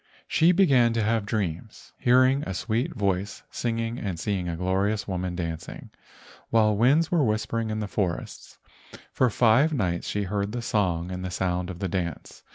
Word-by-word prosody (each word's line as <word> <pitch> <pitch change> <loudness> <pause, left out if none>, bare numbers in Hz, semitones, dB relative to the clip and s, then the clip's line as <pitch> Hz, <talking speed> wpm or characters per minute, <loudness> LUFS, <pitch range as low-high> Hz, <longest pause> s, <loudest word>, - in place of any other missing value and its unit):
She 165 +2 +4
began 135 -11 +4
to 115 -1 0
have 110 -1 0
dreams, 100 -1 -4
hearing 130 +3 +4
a 95 -10 -4
sweet 120 - -2
voice 100 0 -2
singing 115 0 -2
and 95 -5 -4
seeing 95 -2 -2
a 85 - -3
glorious 95 +4 0
woman 90 -2 -3
dancing, 85 -2 -6 0.6
while 110 -2 +3
winds 140 +10 +3
were 170 -4 +3
whispering 110 0 -1
in 110 0 -2
the 105 - -3
forests. 95 -4 -4 0.5
For 130 - +2
five 120 +8 +3
nights 90 -10 -1
she 105 - -1
heard 100 +2 -2
the 120 -1 -3
song 90 -6 0
and 90 0 -5
the 90 - -3
sound 90 0 -2
of 90 - -6
the 95 - -2
dance. 85 -4 -4
105 Hz, 170 wpm, -26 LUFS, 90-120 Hz, 0.6 s, She